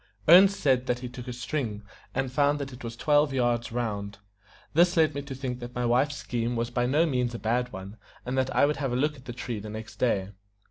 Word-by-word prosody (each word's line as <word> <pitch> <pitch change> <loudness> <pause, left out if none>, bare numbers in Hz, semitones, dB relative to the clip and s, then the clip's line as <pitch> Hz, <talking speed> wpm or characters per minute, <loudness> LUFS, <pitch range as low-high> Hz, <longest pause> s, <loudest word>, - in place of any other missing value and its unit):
Ernest 190 +4 +8
said 130 -2 +2
that 125 - +1
he 125 - -4
took 125 0 -9
a 125 - -4
string, 120 -4 -3 0.3
and 135 -1 -1
found 145 +2 +2
that 140 -2 -5
it 125 - -11
was 115 -1 -5
twelve 145 +1 +3
yards 120 -3 0
round. 105 -4 -3 0.6
This 175 +3 +4
led 155 -2 +4
me 140 - -3
to 140 -1 -7
think 125 -2 -4
that 120 0 -8
my 125 0 -1
wife's 130 +5 +2
scheme 120 -3 -2
was 115 +1 -2
by 120 0 0
no 150 +6 +3
means 125 -5 -1
a - - -3
bad 120 +4 -1
one, 95 +2 -8 0.3
and 125 +2 -2
that 130 0 +1
I - - +5
would 150 0 0
have 135 -3 -2
a - - 0
look 150 +4 +1
at 130 - -16
the 120 - -5
tree 120 -2 -4
the 105 +1 -8
next 110 +1 -8
day. 100 -6 +1
125 Hz, 245 wpm, -27 LUFS, 120-140 Hz, 0.6 s, Ernest